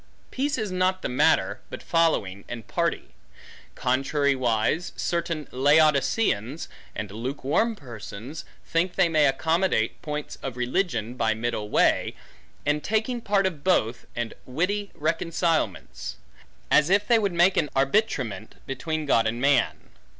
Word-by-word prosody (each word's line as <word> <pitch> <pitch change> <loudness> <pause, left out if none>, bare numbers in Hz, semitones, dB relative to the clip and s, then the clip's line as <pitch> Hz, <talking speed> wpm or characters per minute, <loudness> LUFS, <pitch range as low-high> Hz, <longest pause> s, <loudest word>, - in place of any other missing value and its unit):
Peace 280 +2 -1
is 215 -4 -2
not 185 0 +1
the - - -1
matter, 125 - +2
but - - -8
following, 100 - +1
and 115 -3 -6
party. - - -1 0.7
Contrariwise, 135 +1 +1
certain 170 -3 -2
Laodiceans, 145 - +2 0.3
and 105 -2 -5
lukewarm 135 - -1
persons, 120 - -8 0.2
think 175 +2 0
they - - +4
may 155 -3 +4
accommodate 160 -3 +1
points 150 -1 -5
of 130 -2 -5
religion, 125 - -1
by 115 -3 +1
middle 110 -2 -3
way, - - +2 0.5
and 150 0 +1
taking 220 +3 0
part 200 -3 +2
of 160 -7 -2
both, 120 -11 +1
and 120 -1 -3
witty 190 +10 -1
reconcilements; 165 - -1 0.6
as 150 +2 +5
if 200 +2 +3
they 235 -1 +5
would 200 -3 0
make 175 +2 +4
an 150 -5 +1
arbitrament 135 - 0
between 155 +3 -3
God 115 -5 +3
and 120 +2 -2
man. 135 -1 +1
150 Hz, 130 wpm, -25 LUFS, 120-180 Hz, 0.7 s, as